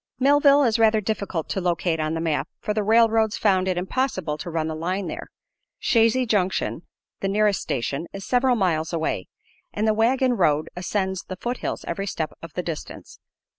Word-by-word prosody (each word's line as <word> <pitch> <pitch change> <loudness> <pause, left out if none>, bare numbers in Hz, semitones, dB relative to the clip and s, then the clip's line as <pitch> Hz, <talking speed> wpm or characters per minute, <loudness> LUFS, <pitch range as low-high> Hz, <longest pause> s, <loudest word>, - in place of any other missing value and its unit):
Millville 285 +1 +5
is 230 -3 +2
rather 220 -1 +4
difficult 200 -5 -3
to 190 - -1
locate 170 -2 0
on 155 +1 -1
the - - -2
map, 160 -2 -1
for 210 - -2
the 215 - 0
railroads 225 0 +3
found 190 -3 +2
it 185 -1 0
impossible 185 - -1
to - - -5
run 160 -1 -1
a - - -3
line 180 +5 -2
there, - - -6 0.5
Chazy 230 +2 +3
Junction, 190 -4 0 0.4
the 195 - -1
nearest 205 0 +2
station, 140 +6 -2
is 195 0 -7
several 250 0 +3
miles 165 -7 0
away, 160 - -2 0.4
and 215 +2 -1
the 215 - +4
wagon 250 +4 +2
road 155 -8 +1
ascends 190 +1 -2
the 185 - -6
foothills 240 +6 -4
every 195 0 -3
step 160 -4 -3
of 165 - -9
the 180 - -3
distance. 165 -3 -7
195 Hz, 180 wpm, -24 LUFS, 170-225 Hz, 0.5 s, Millville